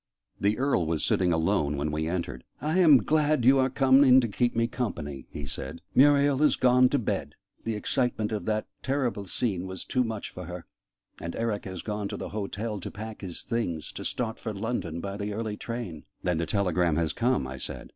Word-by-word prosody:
The 105 +2 +2
Earl 130 - +1
was 80 -1 0
sitting 90 -2 +2
alone 75 -3 +1
when 75 +2 -1
we 80 +1 -1
entered. 85 -8 -3 0.2
"I 155 +6 0
am 155 -8 +7
glad 155 -4 +2
you 135 +1 +6
are 130 0 +3
come 135 +1 +5
in 130 -1 +7
to 120 - 0
keep 120 +3 0
me 115 0 +3
company," 85 - -4
he 75 - -6
said. 70 +5 -6
"Muriel 140 0 +5
is 150 - +5
gone 125 0 +5
to 145 - +2
bed 120 - -2 0.3
the 115 -1 -1
excitement 110 0 0
of 105 - -3
that 110 0 0 0.2
terrible 125 -7 -1
scene 95 -3 -1
was 95 -1 -6
too 130 - +1
much 110 -3 -4
for 90 - -8
her 90 0 -7 0.6
and 85 +1 -5
Eric 115 -3 -2
has 95 -3 -6
gone 105 -1 -3
to - - -5
the - - -5
hotel 105 +1 -3
to - - -6
pack 110 +1 -8
his 90 -4 -4
things, 90 -10 -2
to - - -7
start 115 -2 -2
for 110 - -4
London 95 -6 -3
by 100 0 -4
the 105 0 -3
early 110 -1 -3
train." 110 -9 -6 0.2
"Then 90 -3 +1
the 85 - -1
telegram 90 -4 +1
has 80 0 0
come?" 120 - +1
I 65 +1 -6
said. - - -6
105 Hz, 210 wpm, -28 LUFS, 85-125 Hz, 0.6 s, am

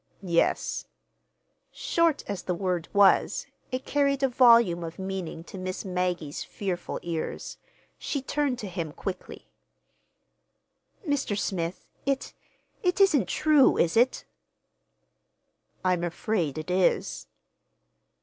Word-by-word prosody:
"Yes." 170 -3 0 0.8
Short 335 -3 +1
as 200 -3 -3
the 180 - -2
word 180 -2 -1
was, 200 -1 +4 0.3
it 255 +1 -3
carried 280 -1 +1
a - - +5
volume 235 -8 +5
of 165 0 -7
meaning 190 -4 -5
to 190 - -9
Miss 185 +2 -4
Maggie's 180 -5 -2
fearful 185 -4 -4
ears. 165 -2 -4 0.4
She 285 - -2
turned 275 -1 -1
to 215 - -6
him 170 -4 -4
quickly. 185 +1 -6 1.6
"Mr. 275 -8 0
Smith, 175 -3 -3 0.2
it—it 360 +6 -3
isn't 300 - +4
true, 305 -3 +4
is 170 - +2
it?" 245 +3 +3 1.6
"I'm 180 -2 +2
afraid 175 -3 -1
it 155 +3 -4
is." 185 0 +1
190 Hz, 110 wpm, -27 LUFS, 175-260 Hz, 1.6 s, a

